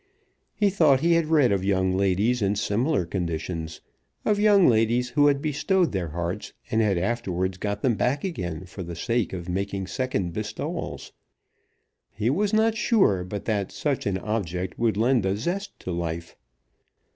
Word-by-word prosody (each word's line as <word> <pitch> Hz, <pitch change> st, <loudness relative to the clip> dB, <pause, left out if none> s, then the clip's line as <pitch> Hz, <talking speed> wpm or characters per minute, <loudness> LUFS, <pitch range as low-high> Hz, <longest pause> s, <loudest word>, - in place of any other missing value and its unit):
He 205 Hz, -2 st, +2 dB
thought 155 Hz, -8 st, +4 dB
he 170 Hz, +1 st, +3 dB
had 165 Hz, -2 st, +2 dB
read 150 Hz, -7 st, +4 dB
of 95 Hz, -2 st, +1 dB
young 95 Hz, -1 st, +1 dB
ladies 100 Hz, +6 st, +1 dB
in 100 Hz, 0 st, +1 dB
similar 110 Hz, -, 0 dB
conditions, 85 Hz, -2 st, -4 dB, 0.4 s
of 210 Hz, -1 st, +2 dB
young 205 Hz, -3 st, +6 dB
ladies 120 Hz, +2 st, +2 dB
who 145 Hz, +1 st, +4 dB
had 140 Hz, -1 st, +2 dB
bestowed 160 Hz, +5 st, +1 dB
their 95 Hz, -4 st, -2 dB
hearts 85 Hz, +5 st, -4 dB, 0.2 s
and 110 Hz, -, +3 dB
had 100 Hz, -4 st, +2 dB
afterwards 95 Hz, -2 st, -1 dB
got 105 Hz, +1 st, -3 dB
them 125 Hz, -, +3 dB
back 125 Hz, +6 st, 0 dB
again 90 Hz, -, -4 dB
for 90 Hz, +2 st, -9 dB
the 85 Hz, -1 st, -6 dB
sake 115 Hz, +6 st, -1 dB
of 90 Hz, -2 st, -6 dB
making 95 Hz, +1 st, -2 dB
second 100 Hz, -7 st, -2 dB
bestowals. 105 Hz, +2 st, -5 dB, 1.0 s
He 110 Hz, +3 st, -1 dB
was 205 Hz, +7 st, +1 dB
not 220 Hz, 0 st, +3 dB
sure 190 Hz, -, +3 dB
but 100 Hz, +2 st, -6 dB
that 100 Hz, -4 st, -1 dB
such 140 Hz, -7 st, -2 dB
an 95 Hz, -2 st, 0 dB
object 95 Hz, -3 st, -3 dB
would 115 Hz, -3 st, +1 dB
lend 120 Hz, 0 st, +3 dB
a 95 Hz, +1 st, 0 dB
zest 185 Hz, -, -4 dB
to 90 Hz, -, -4 dB
life. 85 Hz, -1 st, -4 dB
105 Hz, 170 wpm, -25 LUFS, 95-140 Hz, 1.0 s, young